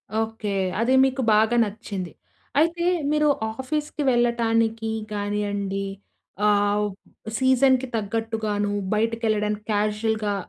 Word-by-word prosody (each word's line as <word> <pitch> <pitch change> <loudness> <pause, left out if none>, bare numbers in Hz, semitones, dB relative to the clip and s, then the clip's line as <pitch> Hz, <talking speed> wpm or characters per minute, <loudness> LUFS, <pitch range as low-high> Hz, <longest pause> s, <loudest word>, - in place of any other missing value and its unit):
Okay. 225 -1 -2 0.3
అది 235 +3 +2
మీకు 265 0 -1
బాగా 220 +3 +3
నచ్చింది. 200 -4 -5 0.5
అయితే, 335 +2 +1 0.3
మీరు 300 0 +3 0.3
ఆఫీస్‌కి 295 +2 -3
వెళ్ళటానికి 230 -2 +1 0.2
గానియండి, 205 -1 -2 0.6
ఆహ్, 205 0 +2 0.5
సీజన్‌కి 260 0 +3
తగ్గట్టుగాను, 215 -1 -1 0.2
బయటకెళ్ళడానికి 215 -1 0
క్యాజువల్‌గా 210 0 0
220 Hz, 85 wpm, -24 LUFS, 210-240 Hz, 0.6 s, బాగా